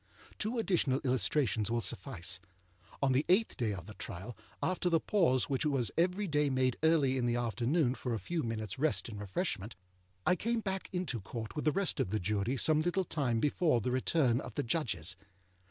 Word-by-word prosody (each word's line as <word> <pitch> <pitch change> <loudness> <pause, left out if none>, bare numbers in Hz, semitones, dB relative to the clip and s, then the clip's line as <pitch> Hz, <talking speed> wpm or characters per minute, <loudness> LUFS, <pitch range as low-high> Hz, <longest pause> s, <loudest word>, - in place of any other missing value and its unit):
Two 220 +3 0
additional 175 - +2
illustrations 125 -3 +1
will 120 +1 +1
suffice. 90 -4 -2 0.6
On 135 - +4
the 130 +3 +3
eighth 205 +5 +3
day 115 -5 0
of 90 -4 -6
the 110 - -9
trial, 100 +4 -7 0.3
after 185 -1 +1
the 165 -1 +3
pause 155 -10 +2
which 135 0 0
was 135 -7 +1
every 180 +4 +1
day 150 -2 +2
made 130 -2 +2
early 155 -5 +3
in 120 - +1
the 120 - +1
afternoon 120 +4 +1
for 125 -3 -3
a - - -3
few 165 - -2
minutesâ 110 -3 -3
rest 150 -4 +1
and 105 -2 -7
refreshment, 105 - -2 0.5
I 180 - +4
came 230 +4 -1
back 190 -2 -3
into 180 - -2
Court 110 +3 -6
with 150 - -3
the 155 - +4
rest 195 +3 0
of - - +1
the 110 +2 0
Jury 105 +7 0
some 155 +3 +4
little 175 +3 0
time 130 -8 0
before 150 0 +2
the 125 +3 -2
return 130 -1 +2
of 115 - -9
the - - 0
Judges. 100 - -1
130 Hz, 195 wpm, -33 LUFS, 115-165 Hz, 0.6 s, On